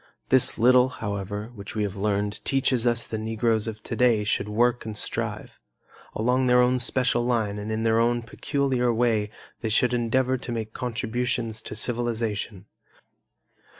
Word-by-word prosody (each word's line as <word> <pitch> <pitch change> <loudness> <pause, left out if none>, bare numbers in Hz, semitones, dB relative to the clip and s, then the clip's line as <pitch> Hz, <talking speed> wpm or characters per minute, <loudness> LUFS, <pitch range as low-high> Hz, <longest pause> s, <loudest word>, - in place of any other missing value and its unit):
This 130 -1 +3
little, 125 +2 +5
however, 105 -1 -5
which 100 -2 -9
we 105 - 0
have 100 -1 -3
learned 105 0 -1
teaches 130 -3 +1
us 120 -1 +2
that - - -5
the 110 - -4
Negroes 110 0 0
of 110 -1 -6
today 120 -4 +2
should 105 0 -1
work 120 +3 +1
and 110 -1 -6
strive. - - -3 0.6
Along 125 +3 +1
their 125 0 +5
own 125 +1 +3
special 125 0 +1
line 110 -4 0
and 105 +1 -5
in 110 0 -1
their 115 0 +3
own 120 0 +1
peculiar 130 0 0
way 115 -3 +1 0.3
they 110 - -3
should 125 +3 +2
endeavor 125 +2 +1
to 120 - -6
make 110 -1 -4
contributions 120 -1 -2
to 105 - -7
civilization. 115 -3 -2
115 Hz, 160 wpm, -25 LUFS, 110-125 Hz, 0.6 s, little